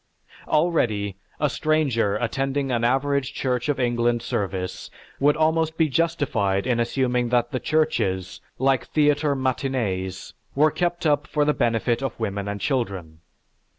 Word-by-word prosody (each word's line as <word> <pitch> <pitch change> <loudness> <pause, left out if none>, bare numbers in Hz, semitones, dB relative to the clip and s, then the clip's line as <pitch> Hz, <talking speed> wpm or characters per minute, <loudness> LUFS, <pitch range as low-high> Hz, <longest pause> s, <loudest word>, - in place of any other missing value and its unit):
Already, 115 - +1 0.2
a 150 - +2
stranger 140 -9 +1
attending 135 +4 -1
an 120 -1 0
average 135 +2 +1
church 125 +1 -1
of 145 - 0
England 120 -1 +1
service 95 -4 -3 0.3
would 145 +1 +3
almost 160 0 +1
be 160 -2 +3
justified 125 -11 0
in 125 -2 +1
assuming 125 0 0
that 120 0 +1
the 130 - -1
churches, 110 - 0 0.2
like 135 0 +1
theatre 145 -1 +2
matinées, 120 -8 -2 0.2
were 150 +2 +4
kept 175 0 -1
up 145 -1 +2
for 150 -1 +1
the 150 - +3
benefit 120 0 0
of 135 -3 -4
women 100 -2 -3
and 100 0 -3
children. 95 - -2
130 Hz, 140 wpm, -24 LUFS, 115-145 Hz, 0.3 s, were